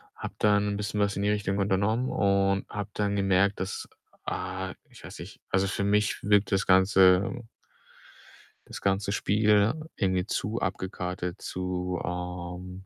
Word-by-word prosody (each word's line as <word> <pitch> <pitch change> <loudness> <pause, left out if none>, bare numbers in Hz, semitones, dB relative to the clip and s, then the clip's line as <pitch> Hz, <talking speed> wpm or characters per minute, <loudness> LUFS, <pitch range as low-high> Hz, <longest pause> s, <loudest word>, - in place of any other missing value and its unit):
habe - - -7
dann 105 -1 +2
bisschen 105 0 -3
was 100 -1 +1
in 100 - -2
die 105 - +2
Richtung 105 -1 -1
unternommen 100 +6 +1
und 100 0 +1
habe 105 0 -5
dann 100 -1 0
gemerkt, 100 0 +2
dass, 95 +2 -4 0.4
ah, 95 +1 -4 0.2
ich - - -16
weiß - - -10
nicht - - -10
also, 95 +1 +2
für 100 - -2
mich 105 0 +1
wirkt 105 0 +3
das 95 -1 +2
ganze, 95 +1 +5
äh 120 - -9 1.2
das - - -8
ganze 100 +1 0
Spiel 105 +1 +3 0.2
irgendwie 95 -2 0
zu 110 +2 -2
abgekartet, 90 -1 -4
zu, 90 -1 -3
ähm, 90 +1 -6
100 Hz, 150 wpm, -27 LUFS, 95-105 Hz, 1.2 s, ganze